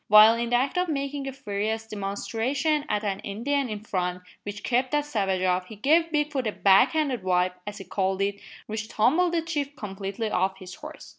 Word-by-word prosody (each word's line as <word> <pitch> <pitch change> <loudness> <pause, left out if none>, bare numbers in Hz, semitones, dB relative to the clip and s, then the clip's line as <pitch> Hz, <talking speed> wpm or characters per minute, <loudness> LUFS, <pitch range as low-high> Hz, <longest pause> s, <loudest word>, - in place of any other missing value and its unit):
While 215 +2 +9
in 235 0 -2
the 245 - +2
act 265 +7 +1
of 360 -1 0
making 280 -1 -2
a - - -2
furious 220 -3 -3
demonstration 230 +9 -1
at 210 - 0
an 195 -2 -1
Indian 255 +6 -1
in 210 -1 -4
front, 180 -3 -2 0.2
which 205 0 -7
kept 255 +1 +1
that 295 0 +2
savage 195 -9 0
off, 180 0 +1
he 220 - -9
gave 320 +9 +3
Bigfoot 295 -5 0
a - - 0
"back 195 +5 +5
handed 285 -8 0
wipe," 180 0 +1
as 205 0 -5
he 195 - -7
called 190 +1 0
it, 200 0 -1 0.3
which 220 0 -4
tumbled 320 +11 +2
the 330 - +1
chief 290 -4 -3
completely 200 +1 -4
off 190 +1 +1
his 185 -2 -10
horse. 305 +7 -10
220 Hz, 205 wpm, -26 LUFS, 195-280 Hz, 0.3 s, While